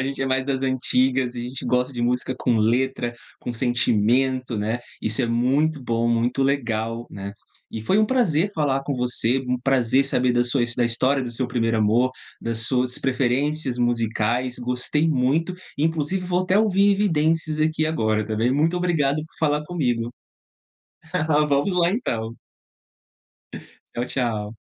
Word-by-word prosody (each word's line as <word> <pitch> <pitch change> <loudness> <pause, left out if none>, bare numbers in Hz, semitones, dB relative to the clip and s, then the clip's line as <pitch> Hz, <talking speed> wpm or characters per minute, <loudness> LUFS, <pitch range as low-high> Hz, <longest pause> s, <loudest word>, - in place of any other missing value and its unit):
A - - -1
gente 135 0 -4
é - - -1
mais 130 0 +1
das 135 -1 -2
antigas 130 -1 +1
e 120 - -5
a - - -4
gente 125 +2 -6
gosta 125 +1 0
de 120 -2 -3
música 125 +2 0
com 120 -3 +1
letra, 120 +2 +1 0.3
com 120 - -4
sentimento, 120 +1 +1
né, 110 +4 -2 0.2
Isso 110 +4 0
é - - +1
muito 135 +6 +1
bom, 115 -1 0
muito 120 +3 +1
legal, 120 -4 -1
né. 100 0 -7 0.4
E 110 - -4
foi 190 - +1
um 215 - +5
prazer 205 - +2
falar 140 -5 0
com 140 - -3
você. 125 0 +2
Um 125 - +1
prazer 130 0 +2
saber 125 -2 +1
da 120 0 +3
sua 120 +1 +1
da 120 - +2
história 130 +4 +1
do 125 - -4
seu 120 +2 -2
primeiro 115 -2 0
amor, 115 +4 +3 0.3
das 115 -1 -1
suas 125 -1 0
preferências 130 +1 0
musicais. 120 +1 0
Gostei 125 +5 0
muito! 150 +5 +1 0.2
Inclusive 160 +4 -1
vou 180 0 +1
até 185 +2 +2
ouvir 205 -2 +3
Evidências 160 -5 +1
aqui 155 0 +1
agora 110 -8 0
também. 110 +2 0
Muito 160 +5 +1
obrigado 160 -6 +1
por 160 - -21
falar 150 -1 +1
comigo. 120 -9 -1 1.4
Vamos 140 +7 +2
lá, 170 0 +4
então. 115 - -2 1.6
Tchau, 120 - -2
tchau. 110 -5 -2
130 Hz, 160 wpm, -23 LUFS, 120-150 Hz, 1.6 s, um